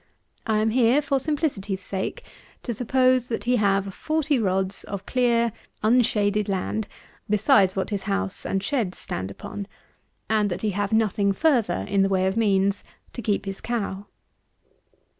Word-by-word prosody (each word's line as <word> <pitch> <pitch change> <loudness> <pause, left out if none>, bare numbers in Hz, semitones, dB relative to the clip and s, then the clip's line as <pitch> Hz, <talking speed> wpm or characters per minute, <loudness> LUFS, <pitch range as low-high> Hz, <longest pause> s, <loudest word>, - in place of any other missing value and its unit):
I 220 -1 +2
am 220 +1 +2
here, 245 +3 +4
for 280 -2 0
simplicity's 265 - -2
sake, 190 0 -4 0.4
to 240 - -2
suppose, 255 +2 +2
that 225 - -3
he 245 +1 +2
have 200 -2 +1
40 310 +1 0
rods 190 -2 0
of 195 -1 -6
clear, 235 -2 +2 0.3
unshaded 210 -3 +2
land, 200 +2 -2 0.4
besides 200 -2 +4
what 190 +2 -2
his 200 -1 -1
house 200 0 -2
and 195 0 -1
sheds 215 -7 -1
stand 95 +2 -4
upon; 200 - -7 0.6
and 215 -2 +2
that 175 - -4
he 215 - +1
have 200 +1 -2
nothing 210 -2 +2
further 260 -3 +1
in 200 -1 +2
the 195 - +3
way 190 -1 +2
of 190 +1 0
means 200 -2 +2 0.3
to 240 - -5
keep 205 -2 -1
his 195 0 -6
cow. 205 -4 -3
210 Hz, 160 wpm, -24 LUFS, 195-240 Hz, 0.6 s, here